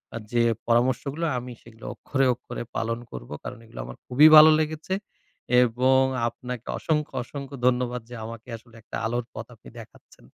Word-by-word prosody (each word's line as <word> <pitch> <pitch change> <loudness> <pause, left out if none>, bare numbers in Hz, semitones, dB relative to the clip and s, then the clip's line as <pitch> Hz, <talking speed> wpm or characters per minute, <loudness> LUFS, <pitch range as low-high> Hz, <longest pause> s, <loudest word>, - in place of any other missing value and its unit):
আ - - -2
যে 120 -1 +3 0.2
পরামর্শগুলো 130 +6 +1
আমি 125 +1 -6
সেগুলো 115 -1 -15
অক্ষরে, 135 -1 -1
অক্ষরে 120 - -7
পালন 115 +1 -2
করবো। 60 +3 -8
কারণ 125 - -7
এগুলো 115 - -12
আমার - - -10
খুবই 140 +5 +7
ভালো 155 +1 +10
লেগেছে 155 +4 -2 0.7
এবং 130 +2 +3 0.3
আপনাকে 125 0 -8
অসংখ্য, 150 -1 -1
অসংখ্য 140 +1 -8
ধন্যবাদ 125 -1 0
যে 125 - -8
আমাকে 115 +1 -9
আসলে 115 0 -21
একটা 110 - -7
আলোর 120 +1 -1
পথ 110 +1 -7
আপনি 105 - -15
দেখাচ্ছেন। 115 - -16
125 Hz, 160 wpm, -25 LUFS, 115-135 Hz, 0.7 s, ভালো